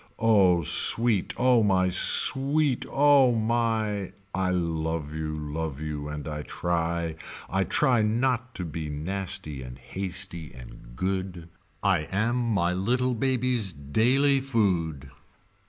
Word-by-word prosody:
Oh 100 -7 +4
sweet 115 +5 +2
oh 125 -1 +4
my 95 -3 +2
oh - - +1
sweet 135 +8 +3
oh 140 -3 +4
my 110 -3 -1 0.2
I 95 0 0
love 80 -3 -2
you 80 0 -4
love 75 -1 -4
you 75 -1 -5
and 75 0 -6
I 75 -1 -4
try 85 0 -2 0.3
I 95 +1 0
try 130 -6 +2
not 125 +3 0
to 90 - -4
be 80 -1 -5
nasty 85 -1 -3
and 60 -1 -9
hasty 95 -3 -4
and - - -13
good 95 +1 -3 0.3
I 90 -6 +2
am 110 +5 0
my 105 -8 0
little 125 +7 0
baby's 125 -5 0
daily 125 - +2
food. 85 - -1
95 Hz, 125 wpm, -26 LUFS, 80-115 Hz, 0.3 s, Oh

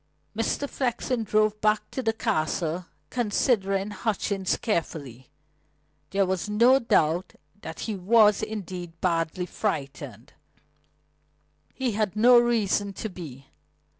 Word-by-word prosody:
Mr. 230 +5 -1
Flexen 250 -2 -1
drove 215 0 +1
back 215 0 +1
to 260 - -3
the 225 -3 +1
Castle, 170 -3 -1 0.2
considering 205 -4 +1
Hutchings 200 -2 -1
carefully. 145 - -3 0.8
There 195 +2 +2
was 185 +1 -2
no 240 +6 +5
doubt 170 - +1 0.3
that 160 - -7
he 220 - -3
was, 210 +2 +4
indeed, 180 -5 -6
badly 170 0 0
frightened; 140 - -4 1.3
but - - -38
he 260 -2 0
had 210 -2 -1
reason 230 -4 +4
to 220 - -5
be. 145 -8 -9
200 Hz, 110 wpm, -26 LUFS, 170-220 Hz, 1.3 s, no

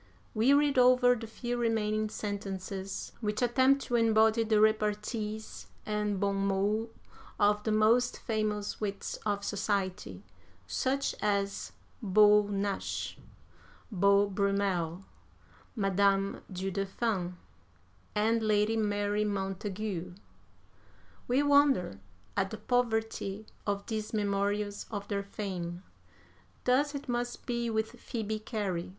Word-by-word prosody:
We 230 +5 +3
read 285 -2 +4
over 250 0 +6
the 225 -2 -5
few 240 +2 -4
remaining 215 -2 0
sentences 195 -2 -5
which 210 +2 -1
attempt 260 +3 +3
to 245 - -2
embody 225 0 +4
the 215 -1 +2
repartees 215 0 0 0.2
and 210 -2 -1
bon 200 0 +1
mots 200 +3 0 0.5
of 210 0 +3
the 220 - -1
most 225 +3 +3
famous 215 -2 -2
wits 200 -1 -3
of 200 -1 -1
society, 190 - -2 0.4
such 260 - 0
as 200 -1 -1 0.3
Beau 210 0 +5
Nash, 200 0 -2 0.8
Beau 200 +1 +4
Brummel, 195 -3 0 0.7
Madame 195 -1 +2
du 190 +1 -3
Deffand, 195 -1 -2 0.8
and 225 +2 +2
Lady 215 0 +2
Mary 205 -1 0
Montagu; 195 -2 -3 1.1
we 255 +4 +3
wonder 280 - +3 0.4
at 195 -1 +1
the 220 - -6
poverty 220 -3 -1 0.2
of 200 0 -1
these 215 -1 -4
memorials 205 0 -1
of 205 -2 -5
their 200 -1 0
fame. 185 -3 -5 0.8
Thus 285 +4 +2
it 280 0 -6
must 240 0 -3
be 235 -2 -1
with 220 0 -1
Phoebe 220 -3 -3
Cary. 205 -6 -3
210 Hz, 110 wpm, -30 LUFS, 200-225 Hz, 1.1 s, over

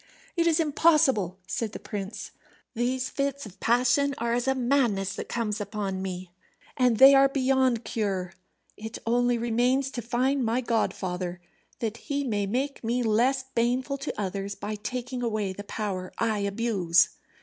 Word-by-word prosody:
"It 340 -1 +2
is 325 -1 +3
impossible," 290 - +3
said 220 +2 -3
the - - -6
prince. 205 -1 -6 0.4
"These 255 +2 -1
fits 280 -1 -2
of 195 -2 -12
passion 250 +4 +2
are 235 0 -1
as 245 +2 0
a 265 - +3
madness 240 -7 +1
that - - -6
comes 220 -2 -2
upon 200 -2 -3
me, 185 -1 -5 0.4
and 250 -4 +3
they 270 +3 +9
are 275 0 +6
beyond 260 -3 +1
cure. 195 -5 -2 0.4
It 220 +2 -7
only 245 +1 +2
remains 245 +4 +1
to 240 - -4
find 255 +4 0
my 230 +2 +1
godfather, 185 -7 -2 0.4
that 225 -1 -2
he 285 +2 -3
may 205 -6 -1
make 265 +7 -2
me 240 +2 0
less 245 +4 +2
baneful 255 +4 0
to 270 - -5
others 195 0 -3
by 205 +2 -5
taking 245 +4 -4
away 215 -5 -1
the 205 +2 -8
power 190 -4 -4
I 220 -2 0
abuse." 200 -4 +2
235 Hz, 160 wpm, -27 LUFS, 205-260 Hz, 0.4 s, they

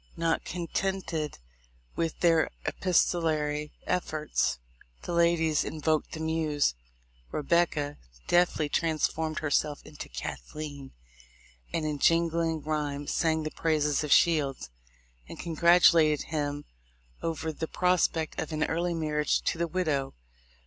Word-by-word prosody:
Not 165 0 0
contented 175 -3 -3 0.6
with 165 -1 -2
their 165 -2 +4 0.2
epistolary 155 -4 +1
efforts, 155 - 0 0.5
the - - -4
ladies 170 -2 +3
invoked 155 0 -1
the 160 - -5
muse. 160 - +1 0.6
''Rebecca" 150 -2 +1 0.3
deftly 175 -3 +3
trans 160 +1 +1
formed 155 -1 -3
herself 145 0 0
into 150 - -9
"Cathleen," 135 - -6 0.8
and 160 - -1
in 150 -2 -2
jingling 165 0 +2
ryhme 145 -2 -2
sang 160 -1 +1
the 155 - -4
praises 150 -3 +1
of 150 - -4
Shields, 145 - +3 0.6
and - - -8
congratulated 170 -2 +4
him 145 -2 -2 0.6
over 160 -1 -2
the 160 +2 -4
prospect 175 -3 +1
of - - -5
an 155 -1 0
early 170 +1 -1
marriage 150 -2 0
to 165 - -1
the 170 - +1
widow. 155 -6 -1
155 Hz, 115 wpm, -28 LUFS, 150-165 Hz, 0.8 s, their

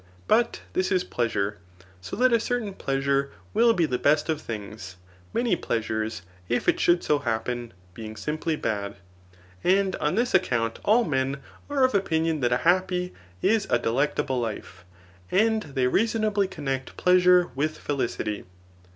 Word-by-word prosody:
But 235 +1 +2
this 185 +1 0
is 185 -1 +2
pfeasute; 105 -4 -1 0.5
Ao - - -2
that 250 +1 +4
a 230 - +5
certain 230 -3 -2
pleasure 140 -3 0 0.2
will 230 +2 +5
be 175 -7 +2
the 125 -4 -2
best 150 +2 +2
of 155 -1 0
thjags, 105 -5 -7 0.4
Biaoey; 230 -7 0
pleasures, 110 -3 -2 0.3
if 120 - 0
it - - +3
should 175 0 +3
so 150 -1 +2
happen, 120 -1 -3 0.2
being 110 +2 -8
simply 155 +5 -2
bad. 100 -7 -3 0.7
And 190 +1 +3
on 150 +4 0
this 240 +3 0
account 115 -10 +1
all 225 +4 +4
men 135 - -1 0.3
are 280 -2 +2
of 255 - +3
opinion 165 -5 +1
that 120 -2 +1
a 125 - +3
happy 180 0 +2 0.3
is 220 -1 +2
a - - +4
delectable 130 +3 0
life, 110 -5 -6 0.5
and 220 +3 +3
they 135 -7 -1
reasonably 215 - +1
connect 135 -7 -4
pleasure 180 -2 +5
with 155 +4 -1
felicity. 120 -6 -3
150 Hz, 150 wpm, -26 LUFS, 120-190 Hz, 0.7 s, a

